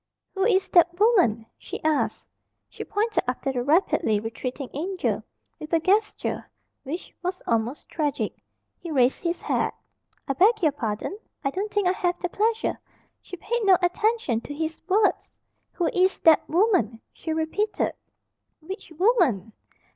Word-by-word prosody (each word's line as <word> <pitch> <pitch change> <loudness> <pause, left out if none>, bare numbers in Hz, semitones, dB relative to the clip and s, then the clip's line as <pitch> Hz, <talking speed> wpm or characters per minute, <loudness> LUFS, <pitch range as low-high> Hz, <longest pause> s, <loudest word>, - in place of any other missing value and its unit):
"Who 385 0 0
is 390 -4 +3
that 345 0 +4
woman?" 360 - +4
she - - -7
asked. 310 -1 0 0.4
She - - -8
pointed 430 +1 0
after 255 +2 -1
the 250 - -1
rapidly 295 - +2
retreating 250 +5 -5
"Angel" 360 +6 -2 0.4
with 305 - -8
a 330 - +5
gesture 410 +5 0 0.3
which 320 +7 -6
was 365 +1 -4
almost 230 +4 -1
tragic. 295 -3 -2 0.5
He 345 - -8
raised 265 -4 +3
his 340 -1 -2
hat. - - 0 0.5
"I 275 - +1
beg 405 - +4
your 310 - +5
pardon? 240 - -4 0.2
I 275 - 0
don't 405 +6 -3
think 410 -3 +1
I - - +4
have 355 -2 -1
the 355 - -2
pleasure 445 +4 0 0.2
" - - -43
She 365 - -9
paid 470 +6 -2
no 385 -3 +6
attention 360 - +1
to 290 - -8
his 320 +1 -3
words. 405 +2 +2 0.4
"Who 350 - -1
is 370 +1 +3
that 320 -2 +5
woman?" 340 - +2
she 320 - -5
repeated. 320 +7 -1 0.7
"Which 360 +2 -8
woman?" 320 - +2
345 Hz, 155 wpm, -25 LUFS, 280-395 Hz, 0.7 s, no